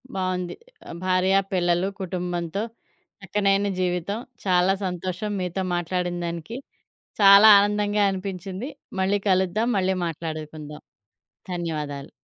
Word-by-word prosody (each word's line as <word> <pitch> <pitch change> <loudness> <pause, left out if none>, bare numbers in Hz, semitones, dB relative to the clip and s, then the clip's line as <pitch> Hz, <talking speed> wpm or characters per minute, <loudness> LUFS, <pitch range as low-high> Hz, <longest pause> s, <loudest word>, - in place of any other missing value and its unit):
బావుంది. 185 -2 -2 0.5
భార్యా 185 +1 +3
పిల్లలు 175 0 +2
కుటుంబంతో 180 +1 -3 0.6
చక్కనైన 195 +1 +1
జీవితం. 180 +3 -1 0.3
చాలా 185 0 +3
సంతోషం 185 +3 -3
మీతో 180 +1 -2
మాట్లాడినదానికి. 175 +2 -3 0.6
చాలా 200 +2 +9
ఆనందంగా 205 0 +1
అనిపించింది. 190 - -5 0.3
మళ్ళీ 195 +2 +2
కలుద్దాం. 190 +4 +2
మళ్ళీ 190 0 +1
మాట్లాడుకుందాం. 155 -2 -6 0.7
ధన్యవాదాలు. 150 -5 -4
185 Hz, 90 wpm, -24 LUFS, 175-195 Hz, 0.7 s, చాలా